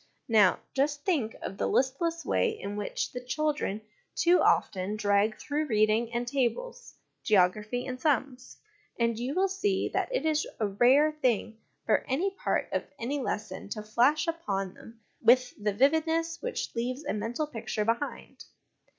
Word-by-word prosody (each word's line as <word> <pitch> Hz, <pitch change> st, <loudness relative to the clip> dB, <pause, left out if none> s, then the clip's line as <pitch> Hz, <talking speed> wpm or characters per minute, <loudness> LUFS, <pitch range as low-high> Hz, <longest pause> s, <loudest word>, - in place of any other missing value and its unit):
Now, 210 Hz, -5 st, +5 dB
just 285 Hz, +1 st, 0 dB
think 280 Hz, -, 0 dB
of 195 Hz, -, -6 dB
the -, -, +1 dB
listless 330 Hz, +6 st, 0 dB
way 475 Hz, -, +2 dB
in 200 Hz, +1 st, -5 dB
which 205 Hz, -1 st, -3 dB
the 250 Hz, 0 st, -6 dB
children 290 Hz, -5 st, -1 dB, 0.3 s
too 350 Hz, +1 st, +4 dB
often 190 Hz, +2 st, +1 dB
drag 205 Hz, +1 st, +2 dB
through 300 Hz, +1 st, -2 dB
reading 215 Hz, 0 st, +2 dB
and 240 Hz, 0 st, -2 dB
tables, 375 Hz, -, -2 dB, 0.3 s
geography 210 Hz, +5 st, +2 dB
and 255 Hz, 0 st, -6 dB
sums, 265 Hz, -3 st, -1 dB, 0.4 s
and 230 Hz, -1 st, +2 dB
you 255 Hz, +5 st, -3 dB
will 380 Hz, +1 st, +3 dB
see 390 Hz, +1 st, 0 dB
that -, -, 0 dB
it -, -, -1 dB
is 310 Hz, -1 st, +1 dB
a 220 Hz, -, +1 dB
rare 250 Hz, +9 st, +4 dB
thing 240 Hz, -6 st, -1 dB, 0.3 s
for -, -, +2 dB
any 340 Hz, +10 st, 0 dB
part 385 Hz, -, -1 dB
of -, -, -1 dB
any 275 Hz, +5 st, -2 dB
lesson 205 Hz, -6 st, -4 dB
to 215 Hz, 0 st, -5 dB
flash 250 Hz, +9 st, +2 dB
upon 200 Hz, -, -2 dB
them 225 Hz, 0 st, -15 dB, 0.2 s
with 250 Hz, +2 st, +4 dB
the 210 Hz, -, +2 dB
vividness 320 Hz, -, +1 dB
which -, -, -4 dB
leaves 255 Hz, +5 st, -3 dB
a -, -, -1 dB
mental 225 Hz, +8 st, -2 dB
picture 225 Hz, -6 st, -3 dB
behind. 235 Hz, +6 st, -3 dB
250 Hz, 160 wpm, -29 LUFS, 215-305 Hz, 0.4 s, Now